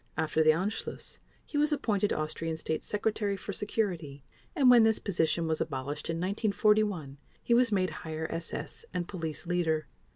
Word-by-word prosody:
After 160 0 +1
the 155 - +5
Anschluss 185 +8 -1 0.3
he 290 - -2
was 300 +1 +3
appointed 210 -8 +1
Austrian 160 +1 -2
State 160 0 -3
Secretary 210 -1 -1
for 200 +2 -6
Security 175 -10 -2 0.3
and 280 -6 +4
when 245 -2 +9
this 220 -1 +4
position 170 -3 0
was 160 -1 0
abolished 140 0 -3
in 165 - -1
1941 200 -5 +1 0.2
he 235 - +2
was 240 -1 +4
made 185 -2 +1
Higher 160 0 -4
SS 165 - -4
and 175 -1 -1
Police 160 -5 -5
Leader. 165 -3 0
180 Hz, 160 wpm, -30 LUFS, 160-210 Hz, 0.3 s, when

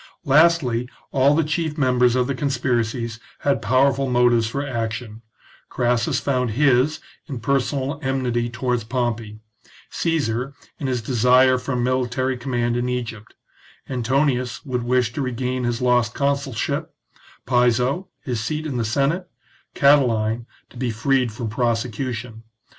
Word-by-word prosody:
Lastly, 140 -5 +3 0.2
all 140 +2 +4
the 165 - +3
chief 155 0 -2
members 125 -3 +3
of 125 -1 +2
the 140 - -1
conspiracies 120 -4 -1 0.2
had 140 -5 +1
powerful 135 +4 +2
motives 120 -2 +3
for 140 +5 -3
action; 115 -3 -4 0.5
Crassus 120 -2 +1
found 125 -3 0
his 140 +1 +3 0.3
in 135 -6 -5
personal 140 +3 -1
enmity 125 -3 -1
towards 125 -1 -1
Pompey, 115 -3 -3 0.5
Caesar 135 -5 -1 0.2
in 140 - -2
his 125 -3 -1
desire 125 +2 +4
for 140 - -4
a - - 0
military 130 +1 0
command 120 -1 -1
in 120 +1 -1
Egypt; 120 -4 -5 0.5
Antonius 130 0 0
would 125 -3 -2
wish 120 0 +1
to 145 - -3
regain 130 0 -2
his 120 +1 -1
lost 120 -2 +2
consulship, 140 -4 -1 0.5
Piso, 125 +7 +2 0.2
his 125 -6 -2
seat 150 +8 -3
in 140 -5 -3
the 120 - 0
Senate, 140 - 0 0.5
Catiline, 120 -5 +3 0.2
to - - -14
be 125 0 -1
freed 125 +2 +1
from 115 +2 -5
prosecution. 115 0 -2
125 Hz, 135 wpm, -22 LUFS, 120-135 Hz, 0.5 s, all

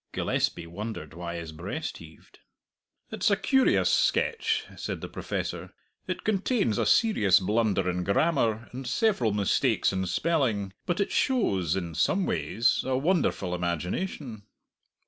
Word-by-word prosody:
Gillespie 85 - -1
wondered 85 -2 -6
why 85 0 -6
his 85 -1 -6
breast 95 - -5
heaved. - - -16 0.7
"It's - - +1
a - - +4
curious 265 - +3
sketch," 465 -2 +1
said - - -4
the - - -6
Professor. - - -5 0.3
"It - - -4
contains 200 - +1
a - - +1
serious 110 - +4
blunder 100 -1 +1
in 90 0 -1
grammar 115 - +1
and 130 +1 -7
several 130 - +1
mistakes 100 -1 +1
in 95 0 -1
spelling, 115 - 0
but 175 +1 0
it 200 - 0
shows, 95 - +1
in 85 -3 -4
some 195 - +1
ways, 115 +2 +1
a 130 -1 0
wonderful 145 - 0
imagination." 100 - -3
110 Hz, 135 wpm, -27 LUFS, -, 0.7 s, a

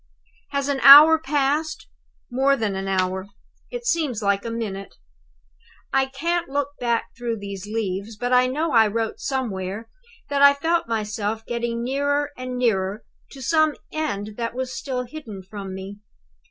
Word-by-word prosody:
"Has 280 -1 -1
an 280 -1 0
hour 300 +4 +10
passed? 295 +2 -1 0.5
More 270 +3 +3
than 210 -4 -1
an 195 0 -4
hour. 190 0 -1 0.4
It - - -6
seems 300 - 0
like 200 0 +1
a 230 - -4
minute. 210 -4 -5 1.0
"I 270 0 +3
can't 335 +5 -2
look 285 0 -1
back 235 -1 -1
through 235 -1 -3
these 200 -1 -7
leaves, 210 0 -3
but 245 +3 -1
I 250 0 +5
know 305 +5 -1
I 225 -3 +5
wrote 225 +1 -2
somewhere 220 -6 -3 0.4
that 285 -1 0
I 280 0 +8
felt 330 +2 0
myself 220 0 -2
getting 235 -1 -2
nearer 285 +3 0
and 255 0 -5
nearer 210 -4 0 0.2
to 270 -2 -10
some 310 +2 +3 0.2
end 210 -9 -3
that 230 0 -3
was 260 0 -3
still 255 -2 -3
hidden 240 -8 -9
from 195 0 -7
me. 195 +2 -8
240 Hz, 155 wpm, -23 LUFS, 205-280 Hz, 1.0 s, hour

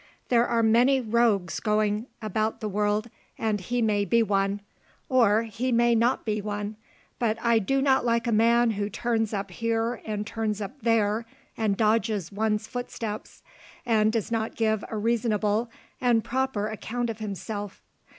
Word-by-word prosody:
There 240 -1 +4
are 230 -1 +1
many 245 +5 +4
rogues 220 -6 +1
going 210 +1 0 0.2
about 215 +1 -1
the 215 - -3
world, 210 +2 0 0.3
and 215 -3 -1
he 240 +5 -1
may 205 -2 +2
be 230 +3 +3
one, 200 -1 0 0.5
or 230 -4 +4
he 230 +3 -3
may 235 0 +4
not 235 +3 +2
be 215 -1 -1
one; 205 +1 -4 0.4
but 225 -2 +1
I 235 -1 +3
do 270 +6 0
not 265 -3 +3
like 235 -1 +1
a 235 - 0
man 230 +2 +4
who 205 -1 -2
turns 225 0 -1
up 195 -2 -3
here 230 +3 -1
and 210 -1 -3
turns 220 -1 -2
up 215 +7 -7
there, 225 0 +1 0.3
and 215 -3 0
dodges 215 -4 +1
one's 210 +1 0
footsteps, 225 -3 -6 0.4
and 220 -2 +3
does 225 -1 -2
not 225 -1 -1
give 220 -2 +1
a 220 - -4
reasonable 220 0 +1 0.3
and 240 -3 +3
proper 260 -4 -1
account 230 +2 -3
of 220 - -9
himself. 205 -1 -5
220 Hz, 160 wpm, -26 LUFS, 210-235 Hz, 0.5 s, There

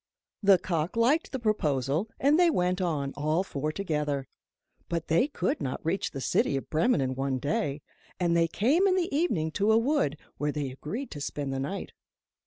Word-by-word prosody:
The 195 -2 +6
cock 170 0 -2
liked 265 +8 +2
the 265 - -2
proposal, 155 - 0
and 290 +4 +4
they 350 -1 +6
went 180 - +1
on, 145 -6 -1
all 155 +5 +1
four 150 -4 -3
together. 150 -7 -2 0.6
But 165 -1 -3
they 170 - +4
could 185 - -2
not 135 -3 -2
reach 180 +5 0
the 135 - -6
city 135 - +1
of 135 - -7
Bremen 160 - +3
in 130 -1 0
one 135 0 -1
day, 145 +1 -2 0.4
and 170 -2 +2
they 165 0 +4
came 280 - +2
in 370 - +3
the 345 -6 0
evening 195 - +1
to 205 +6 +2
a 220 - +5
wood, 230 - +1 0.2
where 150 0 0
they 145 -3 -3
agreed 205 - -6
to 145 - -7
spend 140 -1 -3
the 135 - -2
night. 145 +9 -4
165 Hz, 195 wpm, -28 LUFS, 145-220 Hz, 0.6 s, The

